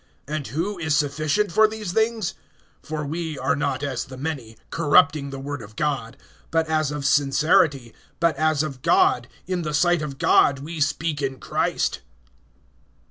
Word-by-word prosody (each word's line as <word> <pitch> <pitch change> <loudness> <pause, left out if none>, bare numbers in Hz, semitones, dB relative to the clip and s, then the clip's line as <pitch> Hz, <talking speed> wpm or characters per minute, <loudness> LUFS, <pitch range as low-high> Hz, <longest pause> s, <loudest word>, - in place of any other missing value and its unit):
And 150 -2 -3
who 175 - -3
is 155 -3 +1
sufficient 155 +7 0
for 215 +5 +5
these 215 -4 -5
things? 220 -1 0 0.5
(17)For 155 -1 -4
we 160 0 -4
are 130 -1 +1
not 140 -1 -2
as 135 -4 -2
the 130 -2 -10
many, 130 -6 -5
corrupting 145 -2 +3
the 135 - -6
word 140 0 -5
of 110 0 -12
God; 135 -4 -2 0.3
but 165 0 +1
as 155 -2 +1
of 150 -1 -4
sincerity, 145 - +3 0.3
but 170 -2 +2
as 155 -1 +1
of 135 -5 -6
God, 125 -1 +3 0.2
in 185 -1 -2
the 150 -2 -2
sight 175 +1 +3
of 145 -3 -5
God 140 0 +4
we 155 +4 -7
speak 150 +1 0
in 135 -1 -3
Christ. - - -1
150 Hz, 165 wpm, -23 LUFS, 140-165 Hz, 0.5 s, for